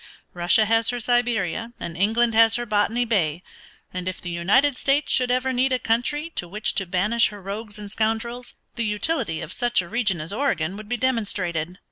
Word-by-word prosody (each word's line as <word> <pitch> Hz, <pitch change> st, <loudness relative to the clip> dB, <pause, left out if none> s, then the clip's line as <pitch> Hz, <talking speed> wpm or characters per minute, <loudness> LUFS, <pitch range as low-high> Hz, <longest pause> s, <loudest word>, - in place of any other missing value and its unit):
Russia 175 Hz, +5 st, +3 dB
has 225 Hz, +1 st, +2 dB
her 245 Hz, -, -2 dB
Siberia 235 Hz, -2 st, 0 dB
and 165 Hz, -, -6 dB
England 225 Hz, +5 st, +2 dB
has 225 Hz, 0 st, +5 dB
her 240 Hz, +1 st, -2 dB
Botany 220 Hz, +3 st, +1 dB
Bay, 175 Hz, -7 st, 0 dB, 0.5 s
and 180 Hz, 0 st, -4 dB
if 185 Hz, -, -3 dB
the 175 Hz, -, -6 dB
United 210 Hz, +12 st, +2 dB
States 275 Hz, +2 st, +1 dB
should 255 Hz, -1 st, +2 dB
ever 255 Hz, +1 st, +1 dB
need 260 Hz, +2 st, +1 dB
a 255 Hz, -, +3 dB
country 295 Hz, +8 st, -1 dB
to 175 Hz, -, -3 dB
which 210 Hz, +5 st, -1 dB
to 195 Hz, -, 0 dB
banish 210 Hz, +6 st, +2 dB
her 205 Hz, -, -9 dB
rogues 205 Hz, +2 st, -4 dB
and 205 Hz, -1 st, -7 dB
scoundrels, 225 Hz, +3 st, -2 dB, 0.2 s
the 235 Hz, -, +1 dB
utility 210 Hz, -, -1 dB
of 160 Hz, -, -5 dB
such 240 Hz, -1 st, +1 dB
a 175 Hz, -, -2 dB
region 210 Hz, -4 st, 0 dB
as 155 Hz, +5 st, -4 dB
Oregon 195 Hz, -, -1 dB
would 215 Hz, 0 st, -10 dB
be 245 Hz, -, -1 dB
demonstrated. 185 Hz, -9 st, -1 dB
220 Hz, 195 wpm, -23 LUFS, 185-245 Hz, 0.5 s, has